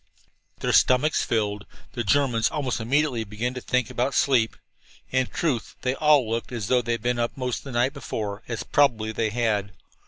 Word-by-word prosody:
Their - - 0
stomachs 135 +4 +4
filled, 105 -3 -1 0.3
the 120 - -2
Germans 120 0 +2
almost 135 -6 -2
immediately 130 +1 +1
began 110 +4 -3
to 125 - -6
think 125 -2 0
about 130 +3 -1
sleep. 120 -5 +3 0.6
In 130 -1 +1
truth, 135 -10 -2
they 125 - +1
all 150 -4 +4
looked 115 +3 -3
as 115 -4 -4
though 125 -1 +4
they 120 -1 -1
had 115 -1 -4
been 120 0 0
up 120 0 0
all 125 -1 -2
of 125 - -3
the 135 - -9
night 125 +3 +1
before, 105 -7 -5
as 115 -4 -4
probably 115 -7 +2
they 110 0 -1
had. 105 -4 -1
120 Hz, 190 wpm, -25 LUFS, 110-130 Hz, 0.6 s, stomachs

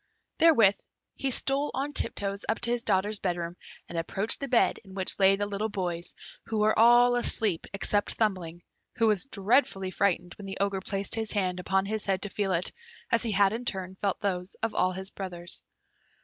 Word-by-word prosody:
Therewith 230 -12 +5 0.4
he 275 - -2
stole 275 +3 +1
on 280 +3 -3
tiptoes 200 -6 0
up 220 - +1
to 235 - +1
his 240 -1 +1
daughters' 205 -1 +1
bed 180 -2 -1
room, 170 0 -5 0.3
and 170 - -4
approached 195 +6 0
the 275 - -4
bed 245 -2 +2
in 190 -2 -14
which 190 0 +4
lay 195 0 +5
the 205 +1 -2
little 205 +2 -3
boys, 175 -4 -4 0.3
who 220 - -2
were 215 +1 +3
all 240 +1 +6
asleep 215 -7 0
except 205 +1 -1
Thumbling, 180 -6 -2 0.3
who 230 - +2
was 210 -2 +2
dreadfully 200 -4 +1
frightened 180 -1 0
when 200 - -8
the 195 - -6
Ogre 200 -1 0
placed 195 0 -1
his 225 -1 -1
hand 185 -3 -1
upon 190 +1 0
his 215 +1 -2
head 190 -1 0
to 205 - -4
feel 195 0 -2
it, 175 0 +1 0.4
as 230 - +3
he 230 - -1
had 200 0 +3
in 235 +2 -4
turn 190 -5 -3
felt 195 0 -2
those 185 -1 -2
of 225 - 0
all 185 0 +1
his 190 +1 -5
brothers. 175 -3 -5
200 Hz, 200 wpm, -28 LUFS, 185-220 Hz, 0.4 s, all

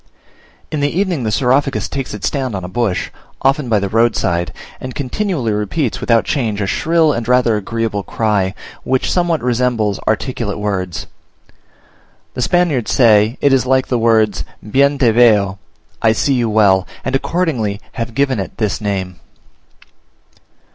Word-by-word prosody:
In 155 - -2
the 145 0 +1
evening 180 -2 -1
the 110 - 0
Saurophagus 135 +4 +1
takes 135 -2 -4
its 105 - -5
stand 130 -6 -2
on 95 - -4
a - - -5
bush, 100 -1 -1 0.3
often 135 -1 +1
by 110 - +3
the 100 -1 -1
roadside, 95 -5 +1 0.3
and 130 -1 -7
continually 145 - -2
repeats 105 +6 -2
without 115 -1 +3
a - - -18
change 110 -7 -1
a 100 - 0
shrill 160 - +2
and 115 -1 -4
rather 125 -2 +3
agreeable 110 0 -2
cry, 100 -2 -1 0.3
which 130 0 0
somewhat 175 -5 +1
resembles 120 -4 0
articulate 110 -1 -1
words: 95 -4 -3 1.3
the 125 - -4
Spaniards 160 -5 +1
say 110 -1 +4
it 140 - +4
is 130 -1 +2
like 130 0 +2
the 125 - +1
words 110 -3 +2 0.2
"Bien 140 +5 +3
te 125 -4 +3
veo" 105 -4 +3 0.4
(I 110 -1 +4
see 125 +6 +1
you 120 -3 +1
well), 100 -4 +3 0.2
and 130 - 0
accordingly 135 - -1
have 115 -2 -5
given 135 -4 +1
it 95 - -6
this 110 -2 -1
name. 95 -3 -3
115 Hz, 155 wpm, -17 LUFS, 105-135 Hz, 1.3 s, say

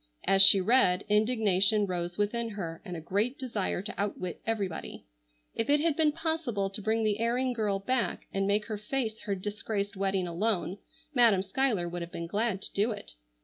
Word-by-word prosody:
As 195 0 +5
she 195 0 +10
read, 190 -3 +3
indignation 210 -2 +2
rose 175 -2 -4
within 230 +3 -1
her, 170 -6 -6
and 180 -5 -6
a - - -7
great 210 - -1
desire 215 -8 -2
to 210 - -6
outwit 185 -3 -4
everybody. 200 -6 -4 0.5
If 225 - -2
it 290 +1 +4
had 320 -1 +1
been 310 -1 +3
possible 300 - -2
to 205 - -3
bring 220 +2 0
the 215 -1 0
erring 245 +2 0
girl 210 -4 0
back 240 +5 -1
and 195 0 0
make 210 +1 +1
her 215 -2 -5
face 220 0 -3
her 200 - -1
disgraced 205 +1 -4
wedding 195 -1 -1
alone, 185 +1 -1 0.3
Madam 230 -7 +4
Schuyler 210 -3 0
would 175 0 -5
have 170 0 -7
been 170 - -5
glad 205 +2 -1
to - - -6
do 205 +4 +1
it. 205 - -7
205 Hz, 190 wpm, -29 LUFS, 195-230 Hz, 0.5 s, she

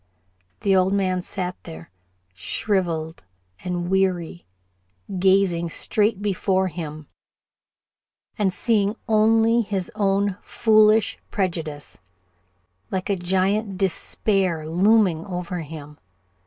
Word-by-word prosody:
The 195 -1 +3
old 185 +1 +3
man 185 -2 0
sat 180 0 -4
there, 80 +2 -11 0.4
shriveled 165 - -2 0.4
and 175 -1 -3
weary 180 -2 -1 0.7
gazing 185 -3 +3
straight 210 +3 0
before 190 -1 +1
him, 155 -2 -7 1.3
and 200 -3 +1
seeing 210 0 +1
only 225 +2 +4
his 195 -2 -3
own 200 -2 +1
foolish 215 -1 +3
prejudice, 165 -7 -4 0.9
like 190 +1 -2
a - - +2
Giant 190 +3 0
Despair, 190 -3 0
looming 185 -1 +3
over 180 -1 -4
him. 150 -2 -9
190 Hz, 95 wpm, -23 LUFS, 170-205 Hz, 1.3 s, only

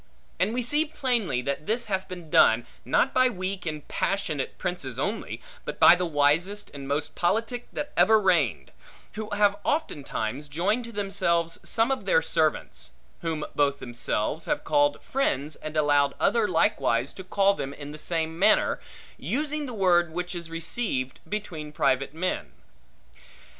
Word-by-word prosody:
And 185 +4 +2
we 245 +1 -1
see 295 +6 +2
plainly 240 - -1
that 140 +3 -3
this 235 +2 0
hath 190 -2 -2
been 175 -4 -9
done, 115 +2 +5 0.2
not 270 - +2
by 255 0 +4
weak 185 -3 -4
and 155 -2 -5
passionate 155 -9 -2
princes 175 -10 -4
only, 200 +11 -3 0.2
but - - -6
by - - +9
the 180 0 0
wisest 165 +7 +1
and 140 -1 -7
most 145 +2 -2
politic 225 +7 -1
that 290 0 -4
ever 220 0 +6
reigned; 145 - +1 0.4
who 215 0 -5
have 205 -1 +3
oftentimes 145 - -2
joined 195 +11 0
to 235 - -9
themselves 190 -5 0
some 230 +3 +1
of 265 - -2
their - - +3
servants; - - -1 0.3
whom 160 -3 -2
both 140 -1 +2
themselves 120 +3 -2
have 295 -1 -1
called 290 0 +2
friends, 155 - -1
and 155 0 -6
allowed 145 -2 +3
other 230 -3 +3
likewise 135 - +1
to 190 - -9
call 195 +1 +3
them 140 -8 -4
in 145 0 -8
the 155 - -9
same 160 0 -2
manner; 215 +3 +4 0.4
using 300 +1 -1
the - - -5
word 175 -4 +3
which 180 +2 -3
is 170 -2 -5
received 165 - -2
between 170 -8 -5
private 135 -2 +1
men. 185 +3 -2
180 Hz, 160 wpm, -26 LUFS, 145-215 Hz, 0.4 s, by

